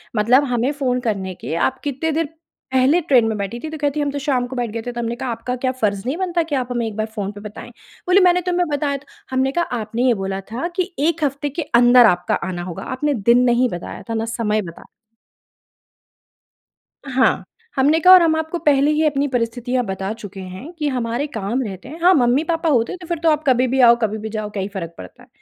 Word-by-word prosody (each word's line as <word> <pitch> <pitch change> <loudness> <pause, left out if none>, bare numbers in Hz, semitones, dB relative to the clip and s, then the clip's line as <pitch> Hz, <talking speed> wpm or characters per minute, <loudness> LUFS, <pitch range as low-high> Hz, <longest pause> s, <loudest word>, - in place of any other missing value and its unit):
मतलब 240 +6 +4
हमें 245 +4 +1
फ़ोन 260 -4 -1
करने 195 -6 -2
के - - -4
आप 265 0 -6
कितने 290 +3 -2
देर 325 +2 0 0.5
पहले 265 +7 +4
ट्रेन 265 -8 +4
में 220 -1 -2
बैठी 200 +4 -4
थी? 315 - -4
तो 315 - -6
कहती 290 0 -1
हैं, 290 - 0
"हम 285 - -1
तो 285 - -4
शाम 265 -4 0
को 260 - -8
बैठ 240 -2 -2
गए 230 0 -4
थे।" 245 +1 -5
तो 240 - -6
हमने 235 0 -2
कहा, 255 0 -4
"आपका 230 +2 -4
क्या 255 +1 -1
फर्ज़ 200 -2 +1
नहीं 275 +6 -2
बनता 350 -3 0
कि 285 - +2
आप 250 -2 -1
हमें 240 -1 -1
एक 210 - -6
बार 215 - 0
फ़ोन 205 -2 -3
पे 205 0 -11
बताएँ?" 215 +3 -9 0.4
बोली, 370 +2 +5
"मैंने 360 0 +3
तुम्हें 355 -1 +1
बताया 285 -1 -1
था। 285 - -17 0.3
"हमने 260 +1 +1
कहा, 345 +4 0 0.2
"आपने 230 +4 -2
ये 245 - +5
बोला 195 0 -3
था 255 +9 -2
कि 370 0 -2 0.2
एक 330 -2 -2
हफ़्ते 285 +1 -1
के - - +2 0.2
अंदर 245 0 +7
आपका 175 - -2
आना 175 -1 -4
होगा। - - -7
आपने 295 +1 0 0.2
दिन 245 +1 +6
नहीं 245 +1 +2
बताया 175 -1 -7
था - - -1
ना 225 0 -1
समय 215 -2 0
बताया। 170 -3 -10 2.3
हाँ, 260 +1 +2 0.3
हमने 290 +4 +3
कहा, 365 +3 +8
"और 370 - +9
हम 320 -1 +3
आपको 320 +2 -2
पहले 290 0 +4
ही 310 +1 +2
अपनी 285 -1 +1
परिस्थितियाँ 245 0 -1
बता 190 +1 -3
चुके 200 -2 -9
हैं 190 - -8
कि 305 -3 -3
हमारे 245 +1 -2
काम 230 -1 -3
रहते 195 +1 -8
हैं। 320 +4 -9
हाँ, 360 +2 +6
मम्मी-पापा 310 +6 +1
होते 235 +2 +1
तो 345 -2 -12
फिर 340 -3 -2
तो 325 - +5
आप 305 0 +1
कभी 255 0 +3
भी 265 +2 0
आओ, 235 -1 +8
कभी 220 -1 0
भी 220 +1 -6
जाओ, 215 -1 -4
क्या 205 -2 -4
ही 195 - -3
फर्क 170 -3 -5
पड़ता 250 - -12
है। - - -19
255 Hz, 240 wpm, -20 LUFS, 225-295 Hz, 2.3 s, और